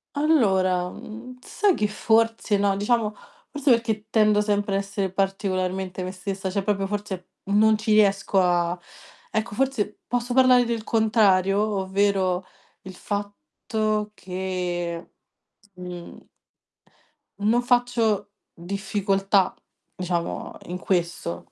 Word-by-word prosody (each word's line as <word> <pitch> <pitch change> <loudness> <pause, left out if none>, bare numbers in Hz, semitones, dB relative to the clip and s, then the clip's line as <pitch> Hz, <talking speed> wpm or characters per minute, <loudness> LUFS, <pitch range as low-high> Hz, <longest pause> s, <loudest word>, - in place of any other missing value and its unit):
Allora, 190 - +2
mhmm, 245 +6 -10
sai 405 -4 +1
che 210 - +1
forse 225 0 +2
no, 200 -1 +2
diciamo, 210 +1 +1 0.4
forse 290 -1 -1
perché 220 -2 +1
tendo 215 -2 +4
sempre 205 -1 0
a - - +3
essere 195 -1 -3
particolarmente 190 -1 -1
me 185 - -4
stessa, 190 0 -4
cioè 195 +1 -1
proprio 195 -1 0
forse 200 -3 -5 0.2
non 215 +1 +5
ci 215 +1 -2
riesco 200 -2 +3
a 175 0 +1 0.5
ecco, 220 -1 -2
forse 245 -5 -1
posso 245 0 -1
parlare 255 -1 +6
del 230 -2 -2
contrario, 210 -4 +3
ovvero 195 -2 +1 0.4
il 190 -1 -9
fatto 210 0 -3
che, 180 -2 -4 0.6
mhmm 180 -1 -9 1.1
non 220 +4 +2
faccio 235 -5 +1 0.2
difficoltà, 195 +1 0 0.4
diciamo 175 -2 -3
in 180 +1 -5
questo. 170 - -2
200 Hz, 110 wpm, -24 LUFS, 185-220 Hz, 1.1 s, parlare